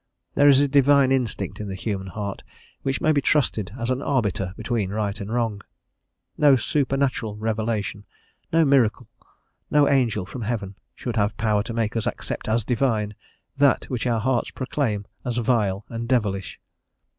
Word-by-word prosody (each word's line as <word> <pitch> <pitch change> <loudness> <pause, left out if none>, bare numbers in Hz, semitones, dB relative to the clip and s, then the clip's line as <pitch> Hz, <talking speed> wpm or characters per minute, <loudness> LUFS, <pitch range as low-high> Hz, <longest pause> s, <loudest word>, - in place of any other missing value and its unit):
There 145 0 +5
is 135 -1 +7
a 145 - +3
divine 140 -1 +4
instinct 125 -5 -1
in 105 - -4
the 95 - -4
human 95 -1 -3
heart 100 0 -5 0.4
which 135 0 -2
may 155 - +3
be 145 -2 +2
trusted 115 - +1
as 120 0 -2
an 130 +1 -1
arbiter 105 -10 0
between 115 -6 -1
right 105 0 -2
and 100 +2 -5
wrong; 115 -4 -1 0.8
no 145 -2 +7
supernatural 135 -4 0
revelation, 110 -1 -2 0.5
no 165 0 +4
miracle, 125 -4 +3 0.6
no 145 -1 +4
angel 120 -8 +2
from 120 +6 -7
heaven, 105 -3 -3 0.2
should 120 -2 -4
have 105 0 +1
power 105 -2 +2
to 115 +2 -5
make 115 -1 -1
us 115 - -1
accept - - -4
as 110 0 +1
divine 115 -4 0 0.4
that 140 -1 +3
which 125 0 -1
our 115 -2 +1
hearts 120 +2 0
proclaim 125 -6 -2 0.2
as 120 -1 -2
vile 110 -5 +1
and 115 0 -5
devilish. 105 -7 0
115 Hz, 165 wpm, -24 LUFS, 105-130 Hz, 0.8 s, is